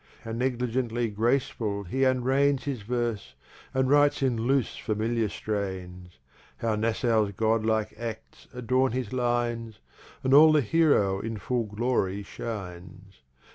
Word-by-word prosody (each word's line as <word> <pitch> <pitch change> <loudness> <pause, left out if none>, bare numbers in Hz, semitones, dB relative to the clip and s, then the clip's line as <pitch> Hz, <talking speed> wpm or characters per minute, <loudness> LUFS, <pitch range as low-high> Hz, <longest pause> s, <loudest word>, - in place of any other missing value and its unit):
How 115 - -6
negligently 120 -1 -1
Graceful 110 -2 0
he 100 +8 -4
unrein's 130 +2 +2
His 135 -6 -3
Verse, 115 - -3 0.4
and 130 0 +1
writes 145 0 +3
in 130 -3 +2
loose 125 +3 0
Familiar 110 +1 -1
strains; 95 -5 -5 0.4
How 115 -1 -1
Nassau's 110 -1 +1
Godlike 110 +1 +1
Acts 115 -2 -7
adorn 125 +1 0
his 125 -3 -3
Lines, 120 -3 -1 0.5
And 130 - +2
all 155 +2 +8
the 150 - +4
Heroe 120 -9 +2
in 115 +1 -4
full 120 +4 -1
Glory 105 -2 -1
Shines. 95 - -8
115 Hz, 125 wpm, -27 LUFS, 105-130 Hz, 0.5 s, all